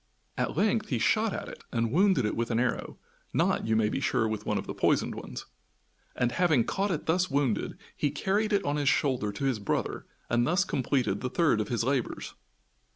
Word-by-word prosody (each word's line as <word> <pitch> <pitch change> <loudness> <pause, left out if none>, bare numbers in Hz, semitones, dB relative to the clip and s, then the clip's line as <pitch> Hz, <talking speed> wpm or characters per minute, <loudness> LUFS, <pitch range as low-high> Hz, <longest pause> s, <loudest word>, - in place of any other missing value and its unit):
At - - -2
length 215 +3 +2
he 130 - 0
shot 215 - +2
at 200 +1 -4
it - - -10
and 115 -2 0
wounded 185 - +3
it 105 - -1
with 115 0 -1
an 115 -1 +1
arrow 125 0 -1 0.4
not, - - +1
you 110 - +2
may 110 -1 +3
be 110 - -1
sure, 125 -4 +1
with 110 -1 -4
one - - +1
of - - -3
the - - -5
poisoned - - +1
ones - - -7 0.7
and, 120 -1 +1
having 155 -4 +3
caught 195 - -1
it 165 -5 -2
thus 180 +3 +1
wounded, 135 -7 0 0.2
he 145 - 0
carried 195 +9 0
it 200 -1 +1
on 145 +1 0
his 145 -2 +2
shoulder 125 -9 +1
to 135 +7 -4
his 130 -5 +1
brother 100 - -2 0.2
and 120 0 +2
thus 180 +4 +2
completed 125 -6 0
the 125 - -2
third 145 -7 +2
of 105 - -3
his 120 0 -1
labors. 130 -1 -2
135 Hz, 215 wpm, -29 LUFS, 115-175 Hz, 0.7 s, wounded